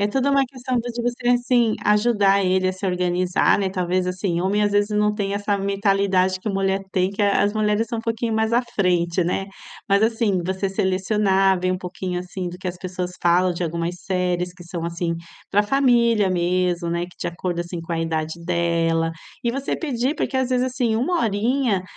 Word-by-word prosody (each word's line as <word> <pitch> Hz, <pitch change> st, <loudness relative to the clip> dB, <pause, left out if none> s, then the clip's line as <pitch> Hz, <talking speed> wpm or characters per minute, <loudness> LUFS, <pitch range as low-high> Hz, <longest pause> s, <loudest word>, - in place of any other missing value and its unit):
É 205 Hz, -, +3 dB
toda 270 Hz, +6 st, 0 dB
uma 275 Hz, -1 st, +4 dB
questão 255 Hz, -1 st, -3 dB
de 235 Hz, 0 st, -4 dB
você, 245 Hz, 0 st, -3 dB
assim, 245 Hz, -2 st, +3 dB
ajudar 210 Hz, -2 st, +3 dB
ele 185 Hz, 0 st, +2 dB
a -, -, 0 dB
se 185 Hz, +2 st, -5 dB
organizar, 180 Hz, 0 st, +2 dB
né. 195 Hz, -2 st, 0 dB
Talvez 185 Hz, -1 st, -1 dB
assim 180 Hz, -1 st, -1 dB
homem, 200 Hz, +3 st, +1 dB
às 205 Hz, -, +2 dB
vezes, 205 Hz, +1 st, +2 dB
não 210 Hz, 0 st, +3 dB
tem 200 Hz, -1 st, -2 dB
essa 205 Hz, 0 st, -1 dB
mentalidade 195 Hz, -2 st, +1 dB
que 215 Hz, -, -5 dB
a -, -, -1 dB
mulher 195 Hz, 0 st, 0 dB
tem. 185 Hz, +1 st, +1 dB
Que 200 Hz, -, -6 dB
as 205 Hz, 0 st, +3 dB
mulheres 215 Hz, +1 st, +1 dB
são 230 Hz, -2 st, -3 dB
um -, -, -2 dB
pouquinho 230 Hz, 0 st, -2 dB
mais 220 Hz, +1 st, +1 dB
à 240 Hz, +2 st, +3 dB
frente, 180 Hz, -5 st, 0 dB
né. 195 Hz, +2 st, -1 dB, 0.4 s
Mas 200 Hz, 0 st, +4 dB
assim, 225 Hz, -5 st, +1 dB
você 190 Hz, +1 st, -1 dB
selecionar, 195 Hz, 0 st, +2 dB
ver 185 Hz, +1 st, 0 dB
um 185 Hz, -, -1 dB
pouquinho, 180 Hz, 0 st, -4 dB
assim, 180 Hz, 0 st, -5 dB
do 175 Hz, -, -8 dB
que 185 Hz, 0 st, -4 dB
as 175 Hz, -, -5 dB
pessoas 180 Hz, 0 st, -4 dB
falam 175 Hz, +1 st, +3 dB
de 175 Hz, +1 st, -3 dB
algumas 170 Hz, +1 st, -3 dB
séries 180 Hz, -2 st, -1 dB
que 180 Hz, -, -13 dB
são 170 Hz, -1 st, -5 dB
assim 170 Hz, 0 st, -2 dB, 0.3 s
para 205 Hz, +1 st, +3 dB
família 235 Hz, -5 st, +3 dB
mesmo, 175 Hz, -1 st, 0 dB
né. 170 Hz, +1 st, -1 dB
Que, 180 Hz, -, -18 dB
de -, -, -3 dB
acordo, 175 Hz, 0 st, -3 dB
assim, 175 Hz, 0 st, -5 dB
com 165 Hz, +1 st, -6 dB
a 165 Hz, -, -1 dB
idade 160 Hz, -1 st, -2 dB
dela. 165 Hz, -1 st, +1 dB, 0.3 s
E 235 Hz, -, +1 dB
você 275 Hz, +3 st, -2 dB
pedir, 265 Hz, -2 st, -1 dB
porque, 275 Hz, -, -2 dB
às 260 Hz, -1 st, 0 dB
vezes, 250 Hz, 0 st, +2 dB
assim, 245 Hz, -3 st, 0 dB
1 335 Hz, +10 st, +1 dB
horinha 225 Hz, -1 st, +1 dB
195 Hz, 210 wpm, -22 LUFS, 180-220 Hz, 0.4 s, uma